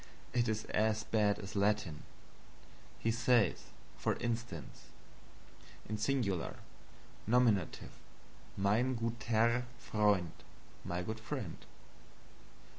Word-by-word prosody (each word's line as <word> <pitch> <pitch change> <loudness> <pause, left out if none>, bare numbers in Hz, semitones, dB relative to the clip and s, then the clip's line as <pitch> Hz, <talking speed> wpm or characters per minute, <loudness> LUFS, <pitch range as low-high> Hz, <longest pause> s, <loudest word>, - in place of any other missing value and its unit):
It 120 -1 +2
is 110 0 -1
as 110 0 +1
bad 105 -2 +2
as 95 -1 -8
Latin. 100 -6 +1 1.0
He 115 - +1
says, 115 -2 +3 0.3
for - - +1
instance: 115 -8 -4 1.1
SINGULAR 110 -5 0 0.7
Nominative 115 -7 +2 0.7
Mein 110 +7 +2
gutER 115 +1 +1
Freund, 105 -7 +2 0.5
my 90 +1 -2
good 110 +4 -4
friend. 110 - -5
110 Hz, 85 wpm, -35 LUFS, 100-115 Hz, 1.1 s, says